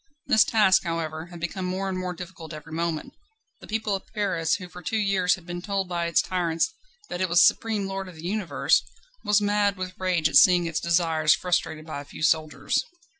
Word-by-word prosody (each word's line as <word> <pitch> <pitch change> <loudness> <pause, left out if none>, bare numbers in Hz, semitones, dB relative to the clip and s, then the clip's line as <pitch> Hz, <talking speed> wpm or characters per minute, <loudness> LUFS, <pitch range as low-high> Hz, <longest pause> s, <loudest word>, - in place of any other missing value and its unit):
This 220 - +5
task, 205 -4 +4
however, 165 -1 -3
had 175 -1 -11
become 175 +2 -4
more 190 +2 -2
and 190 - -2
more 180 -1 -3
difficult 170 -2 -9
every 155 +1 -11
moment. 165 -1 -3 0.5
The - - -13
people 215 -1 -1
of 195 - -4
Paris, 185 -6 +1
who 180 -2 -7
for 180 0 -11
two 220 +6 -2
years 195 -3 +2
had 175 - -16
been 175 0 -5
told 195 0 -2
by 170 -1 -2
its 170 - +2
tyrants 175 - -1 0.4
that 175 - -4
it 185 - +1
was 175 0 +6
supreme 220 -3 +1
lord 195 0 -4
of 180 - -11
the 160 +1 -10
universe, 195 -1 +1 0.4
was 210 0 +3
mad 205 -1 +1
with 185 0 -5
rage 180 -4 +1
at - - +4
seeing 180 -2 +6
its 165 -2 -1
desires 165 -2 +3
frustrated 165 -3 -1
by 155 -3 -5
a - - -12
few 150 - -9
soldiers. 155 -1 +1
180 Hz, 210 wpm, -25 LUFS, 165-195 Hz, 0.5 s, was